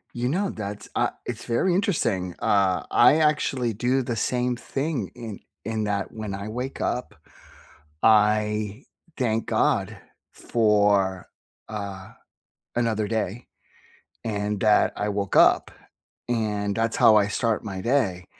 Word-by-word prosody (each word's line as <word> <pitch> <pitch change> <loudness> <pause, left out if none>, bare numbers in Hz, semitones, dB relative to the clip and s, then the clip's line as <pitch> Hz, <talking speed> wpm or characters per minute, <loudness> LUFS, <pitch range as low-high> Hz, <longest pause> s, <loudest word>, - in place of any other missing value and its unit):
You 120 +1 -1
know, 190 +5 0
that's 105 -1 -6
a - - +2 0.2
it's - - -6
very 120 +10 +1
interesting. 115 - 0
Uh, 95 -3 +2
I 120 +4 +6
actually 150 -6 +1
do 125 +5 0
the 120 -1 -3
same 125 +2 0
thing 140 +4 -3
in 115 -5 -7 0.3
in 110 0 -2
that 100 -1 -2
when 110 -3 -5
I 100 +2 -6
wake 125 +4 -5
up, 125 +1 -2 0.9
I 105 +1 +3 0.3
thank 115 -3 0
God - - +1 0.4
for, 105 -4 +2 0.4
uh, 100 -3 -6 0.7
another 110 -3 0
day 110 +1 -3 0.8
and 105 -2 -2
that 105 -1 +4
I 105 - -1
woke 100 -1 -2
up - - +5 0.6
and 105 -3 -1
that's 115 +1 0
how 110 - +6
I 100 -1 +3
start 115 +1 -1
my 100 -3 -5
day. 100 -8 0
110 Hz, 130 wpm, -25 LUFS, 100-120 Hz, 0.9 s, I